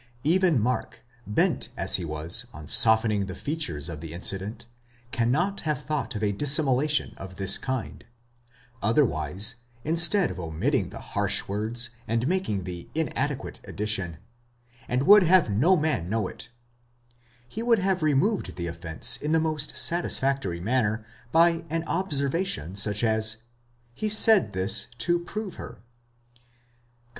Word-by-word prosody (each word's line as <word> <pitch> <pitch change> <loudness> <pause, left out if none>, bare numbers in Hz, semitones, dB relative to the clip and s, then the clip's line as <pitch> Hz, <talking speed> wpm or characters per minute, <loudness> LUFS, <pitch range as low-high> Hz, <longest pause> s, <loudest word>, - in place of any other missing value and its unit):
® - - -27 0.2
Even 170 -2 +3
Mark, 125 +1 -3 0.2
bent 105 - 0
as - - +2
he 90 - -5
was 80 +10 -2
on 75 -4 -10
softening 110 0 +4
the 95 - -6
features 145 - -2
of 80 -3 -6
the 80 -1 -8
incident, 100 +6 -1 0.5
cannot 145 +12 0
have 155 -2 -2
thought 150 -5 -3
of 105 - -4
a 105 - +2
dissimulation 145 +4 +2
of 95 -1 -9
this 95 0 +1
kind; 130 -2 -4 0.8
otherwise, 100 - +1 0.3
instead 170 +4 +2
of 95 - -8
omitting 80 -2 -1
the - - -9 0.2
harsh - - +1
words 115 +4 -2 0.2
and 115 +2 0
making 175 - -1
the 90 -1 -8
inadequate 145 -3 -2
addition, 95 -6 -2 0.7
and 125 +2 0
would 205 +5 +8
have 180 - +4
no 160 - +3
man 150 - -1
know 110 -2 -1
it, 115 - -9 1.0
he 220 - -6
would 235 -1 +3
have 190 -2 0
removed 155 +8 +1
the 85 -1 -4
offence 85 -1 0
in 150 +1 -2
the 160 - +4
most 155 -2 -2
satisfactory 135 - +2
manner, 110 +1 -1 0.3
by 165 0 +4
an 165 +1 -2
observation 150 - -2
such 105 +2 0
as, 110 0 +2 0.6
he 215 - -2
said 215 - +4
this 95 +2 +1
to 175 +6 +2
prove 195 +2 -6
her - - -8
(comp. 105 - -25
120 Hz, 145 wpm, -26 LUFS, 100-160 Hz, 1.0 s, would